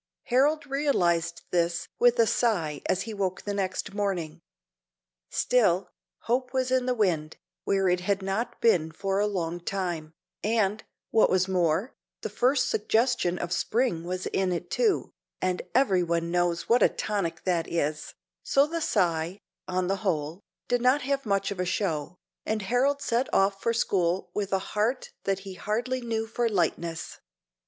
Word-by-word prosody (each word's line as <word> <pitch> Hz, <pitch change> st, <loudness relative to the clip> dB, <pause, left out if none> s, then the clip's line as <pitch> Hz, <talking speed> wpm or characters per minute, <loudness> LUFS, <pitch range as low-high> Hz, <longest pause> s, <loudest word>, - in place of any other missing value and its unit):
Harold 290 Hz, +5 st, +2 dB
realized 175 Hz, -, +1 dB
this 170 Hz, -1 st, 0 dB
with 245 Hz, 0 st, +5 dB
a 230 Hz, -, +5 dB
sigh 175 Hz, -, 0 dB
as 185 Hz, -, +1 dB
he 225 Hz, -, -6 dB
woke 190 Hz, -3 st, -2 dB
the 205 Hz, -, -3 dB
next 195 Hz, 0 st, -2 dB
morning. 175 Hz, -6 st, -2 dB, 0.9 s
Still, 195 Hz, -7 st, +2 dB, 0.3 s
hope 250 Hz, +2 st, 0 dB
was 255 Hz, -1 st, 0 dB
in 255 Hz, -1 st, +2 dB
the 250 Hz, -, +1 dB
wind, 165 Hz, -8 st, 0 dB, 0.3 s
where 195 Hz, -1 st, +2 dB
it 180 Hz, 0 st, +2 dB
had 195 Hz, +2 st, -1 dB
not 195 Hz, +5 st, -2 dB
been 170 Hz, -9 st, +3 dB
for 195 Hz, +3 st, -1 dB
a 210 Hz, -, +2 dB
long 175 Hz, -4 st, -2 dB
time, 175 Hz, -4 st, -3 dB, 0.3 s
and, 215 Hz, -1 st, +1 dB, 0.3 s
what 220 Hz, -, +5 dB
was 185 Hz, 0 st, +2 dB
more, 180 Hz, +4 st, +1 dB, 0.3 s
the -, -, -3 dB
first 255 Hz, +1 st, +2 dB
suggestion 220 Hz, -4 st, +1 dB
of 175 Hz, +1 st, -3 dB
spring 220 Hz, -2 st, 0 dB
was 180 Hz, +1 st, -4 dB
in 190 Hz, -1 st, 0 dB
it 175 Hz, 0 st, -4 dB
too, 450 Hz, -5 st, +1 dB, 0.3 s
and 185 Hz, -1 st, 0 dB
every 220 Hz, -9 st, +4 dB
one 170 Hz, -1 st, -1 dB
knows 175 Hz, -1 st, 0 dB
what 240 Hz, +2 st, +4 dB
a -, -, +6 dB
tonic 200 Hz, -6 st, -3 dB
that 175 Hz, -3 st, 0 dB
is; 155 Hz, -2 st, -2 dB, 0.3 s
so 275 Hz, +1 st, +3 dB
the 335 Hz, +2 st, -3 dB
sigh, 175 Hz, -, +1 dB, 0.3 s
on 185 Hz, 0 st, 0 dB
the 195 Hz, +2 st, 0 dB
whole, 170 Hz, -3 st, -2 dB, 0.3 s
did 245 Hz, -1 st, +1 dB
not 255 Hz, +3 st, +3 dB
have 275 Hz, -2 st, -1 dB
much 200 Hz, -1 st, +1 dB
of 195 Hz, -, -5 dB
a -, -, +2 dB
show, 175 Hz, -3 st, -2 dB, 0.3 s
and 215 Hz, -1 st, -2 dB
Harold 265 Hz, +7 st, +1 dB
set 240 Hz, +2 st, 0 dB
off 195 Hz, 0 st, +2 dB
for 230 Hz, -, +1 dB
school 185 Hz, -5 st, 0 dB
with 200 Hz, -2 st, -2 dB
a 195 Hz, -, +3 dB, 0.2 s
heart 225 Hz, +5 st, 0 dB
that 195 Hz, 0 st, 0 dB
he 195 Hz, -, -6 dB
hardly 240 Hz, +7 st, -2 dB
knew 225 Hz, -2 st, -2 dB
for 230 Hz, +1 st, -1 dB
lightness. 170 Hz, -4 st, -2 dB
195 Hz, 165 wpm, -27 LUFS, 175-235 Hz, 0.9 s, a